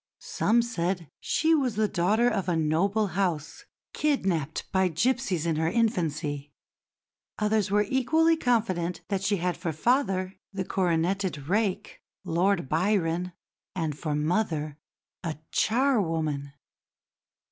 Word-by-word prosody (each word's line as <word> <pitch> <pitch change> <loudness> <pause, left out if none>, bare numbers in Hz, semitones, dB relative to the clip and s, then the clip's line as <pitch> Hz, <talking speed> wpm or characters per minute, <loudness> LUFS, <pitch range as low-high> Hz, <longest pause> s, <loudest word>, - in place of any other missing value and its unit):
Some 235 +2 +2
said 180 - -2
she 325 +1 +2
was 265 -7 +1
the 215 0 +2
daughter 205 +6 +2
of 200 -6 0
a 175 - +1
noble 185 +7 +1
house, 175 - -2 0.3
kidnapped 185 - 0
by 190 -1 +3
gipsies 185 - 0
in 165 -2 0
her 160 +1 +1
infancy; 160 -9 -1 0.9
others 210 -2 +1
were 210 +1 +3
equally 320 +7 +3
confident 210 - 0
that 195 -2 -1
she 195 +1 +1
had 180 0 -1
for 170 -1 -3
father 190 - 0
the 190 -2 -3
coroneted 175 -3 0
rake, 200 +1 -1 0.2
Lord 180 -1 +1
Byron, 175 +1 0 0.4
and 160 -5 -2
for 150 0 -3
mother 155 -2 -1 0.4
a 160 -3 -3
charwoman. 165 - +1
185 Hz, 120 wpm, -27 LUFS, 165-215 Hz, 0.9 s, by